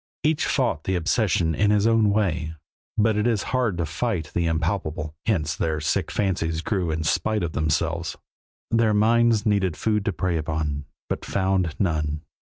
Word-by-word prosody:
Each 155 0 +2
fought 120 - 0
the 95 - 0
obsession 90 -2 +1
in 105 +7 +2
his 105 0 +3
own 115 -2 +4
way, 85 -7 0 0.4
but 110 0 +3
it 105 +2 +1
is 115 -4 +1
hard 120 -8 +1
to 85 - 0
fight 85 +1 -2
the 85 -1 +1
impalpable, 80 -1 -1
hence 80 -8 +1
their 80 -2 -1
sick 75 - 0
fancies 85 -5 -1
grew 95 -3 -1
in 80 0 -1
spite 110 +5 +1
of 85 - -2
themselves. 80 +2 -1 0.5
Their 115 -2 +3
minds 115 +1 +3
needed 95 -6 +1
food 105 +3 0
to 100 - +1
prey 85 0 -1
upon, 75 -2 -2 0.2
but - - -3
found 95 -4 0
none. 75 -5 0
90 Hz, 165 wpm, -24 LUFS, 80-105 Hz, 0.5 s, own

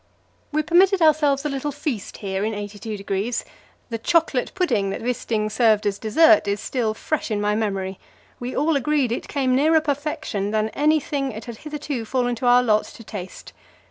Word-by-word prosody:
We 305 +1 +1
permitted 365 +4 +4
ourselves 300 -3 +3
a - - +1
little 275 +1 -3
feast 280 - -4
here 195 -1 -3
in 220 +1 -1
82°. 205 +1 -3 0.5
The 230 - -2
"chocolate 325 -1 +1
pudding" 240 - +1
that 195 - -4
Wisting 230 -3 -1
served 220 -2 +3
as 200 -1 -1
dessert 315 +4 +5
is 200 +1 0
still 225 -3 -1
fresh 310 +4 -2
in 210 -2 -1
my 210 0 +1
memory; 195 -3 -2 0.4
we 245 +1 -5
all 305 +2 +2
agreed 280 -2 +1
that - - +2
it - - -9
came 260 -3 +1
nearer 315 +4 +4
perfection 290 -8 -2
than 215 0 0
anything 290 0 0
it 220 0 -8
had 235 -3 -8
hitherto 295 -4 -5
fallen 245 +1 0
to 245 - -1
our 245 +1 +6
lot 215 -3 +2
to 230 - -12
taste. 190 -4 -8
245 Hz, 180 wpm, -23 LUFS, 215-295 Hz, 0.5 s, our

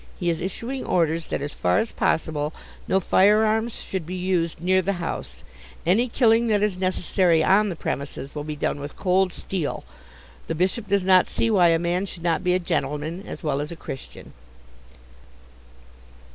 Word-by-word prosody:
He 175 -3 +1
is 165 - -3
issuing 235 +8 -4
orders 165 -2 0
that - - -3
as 145 - -5
far 90 0 +1
as 225 - 0
possible 160 -5 -1 0.3
no 190 - +3
firearms 215 +4 +3
shall 190 - -3
be 175 +2 -7
used 180 -3 -1
near 185 +2 +2
the 195 +2 -1
house; 115 - -5 0.4
any 210 +9 +3
killing 230 -1 +3
that 210 -2 +2
is 210 -3 +1
necessary 185 -2 +2
on 205 +4 +4
the 180 - -4
premises 140 -1 -5
will 150 - -4
be 150 0 -5
done 145 - -2
with 145 +1 -7
cold 185 0 +2
steel. 175 -4 -3 0.6
The 165 - -2
Bishop 190 +6 -1
does 200 0 +2
not 185 -1 +5
see 230 - 0
why 185 -5 +5
a 165 -1 +4
man 175 +3 -1
should 175 -2 -9
not 170 -2 +1
be 180 0 +2
a - - +4
gentleman 155 +2 -3
as - - -8
well 145 -2 0
as 150 - -5
a - - -6
Christian." 135 -5 -9
180 Hz, 180 wpm, -24 LUFS, 160-195 Hz, 0.6 s, not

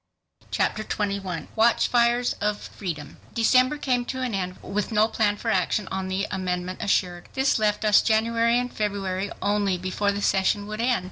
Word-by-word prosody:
Chapter 215 - 0
21 200 -5 -3
Watchfires 235 +1 +3
of 210 0 0
Freedom 155 -7 -7 0.2
December 255 +4 +3
came 250 -4 0
to 260 +1 -4
an 245 -3 -2
end 185 -2 -3
with 210 +3 -2
no 215 0 +4
plan 215 -2 0
for - - -2
action 190 +2 0
on 190 0 -2
the 190 +2 -1
amendment 185 -1 -3
assured. 180 -3 0
This 265 -3 +2
left 210 0 +1
us 210 -1 +6
January 230 +1 +2
and 250 0 -2
February 200 -2 -2
only 200 -2 +1
before 185 +3 -1
the 200 0 -3
session 195 +1 +2
would 215 +2 -5
end. 245 0 +2
210 Hz, 165 wpm, -25 LUFS, 190-230 Hz, 0.2 s, us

